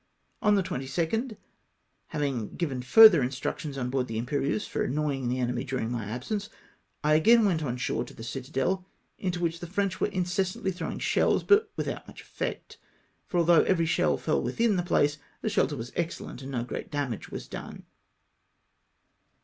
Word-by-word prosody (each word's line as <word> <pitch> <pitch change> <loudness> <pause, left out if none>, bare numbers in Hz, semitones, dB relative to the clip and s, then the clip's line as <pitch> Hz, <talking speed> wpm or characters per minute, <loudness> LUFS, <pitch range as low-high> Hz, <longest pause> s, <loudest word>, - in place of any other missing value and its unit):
On 210 -3 +4
the 195 - +2
22nd, 135 -7 -5
after 220 - -1 0.7
having 140 -8 -2
given 140 -7 -2
fm'ther 175 - +8
instructions 135 +3 -3
on 125 -1 -2
board 130 -1 0
the 110 -1 -3
Tmpcrieuse 140 - -1
for - - -1
annoying 140 -2 -1
the 125 - 0
enemy 125 0 -1
dm^ing 125 -3 -2
my 115 -3 -3
absence, 195 - -4 0.5
I 150 +1 +4
again 225 +9 +6
Avent 180 -6 +2
on 125 -5 -2
shore 125 - -1
to - - -12
the 115 - -9
citadel, 135 +9 -2 0.4
into 180 -2 -2
which 170 -1 -1
the 175 - -6
French 195 +1 -1
were - - +3
incessantly 185 +1 -1
throw 180 - -4
ing - - -5
shells, - - +2
but 410 +2 +4
without - - -4
much - - -11
effect; - - -5 0.5
for 180 - -2
although 170 -1 +6
every 165 -3 +2
shell 165 - +2
feU - - 0
within 230 -3 +1
the 180 - +1
place, 150 -4 +1 0.2
the - - +1
shelter 150 - +1
was 120 -1 -6
excellent, 170 -6 -4
and 135 - -7
no 120 -3 -1
great 120 - -6
damage 140 -7 -3
was - - -7
done. - - -8
150 Hz, 180 wpm, -28 LUFS, 130-185 Hz, 0.7 s, fm'ther